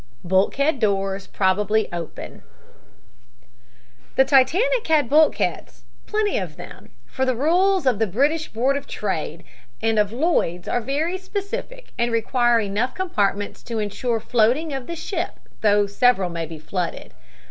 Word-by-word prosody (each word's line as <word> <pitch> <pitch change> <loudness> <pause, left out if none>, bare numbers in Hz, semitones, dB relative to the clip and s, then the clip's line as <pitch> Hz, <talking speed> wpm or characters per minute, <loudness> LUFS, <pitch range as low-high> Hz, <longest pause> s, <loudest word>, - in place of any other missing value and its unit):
BULKHEAD 230 - +2
DOORS 195 -2 0
PROBABLY 210 +3 +1
OPEN 170 -2 -7 1.7
"The 265 - +5
Titanic 375 - +3
had 305 -5 +3
bulkheads, 305 +4 +1 0.2
plenty 425 -1 0
of - - -6
them, - - -11 0.2
for 265 - -3
the 260 -1 +1
rules 360 +6 +2
of 250 -5 +2
the 220 - +2
British 290 - +1
Board 255 +5 0
of 280 - -7
Trade 170 -4 -4 0.4
and 225 -1 +1
of 210 -1 +2
Lloyds 235 - 0
are 245 - 0
very 305 +9 -1
specific 435 +6 -6
and 235 0 +1
require 240 +1 +2
enough 210 +4 -1
compartments 205 - -1
to 230 -2 -5
insure 220 +3 -1
floating 245 +8 +1
of 270 -2 -5
the 340 - -4
ship 340 +1 -4 0.2
though 205 -1 +4
several 200 -2 +2
may 165 -1 -4
be 160 0 -8
flooded. 170 +3 -4
240 Hz, 140 wpm, -22 LUFS, 200-310 Hz, 1.7 s, The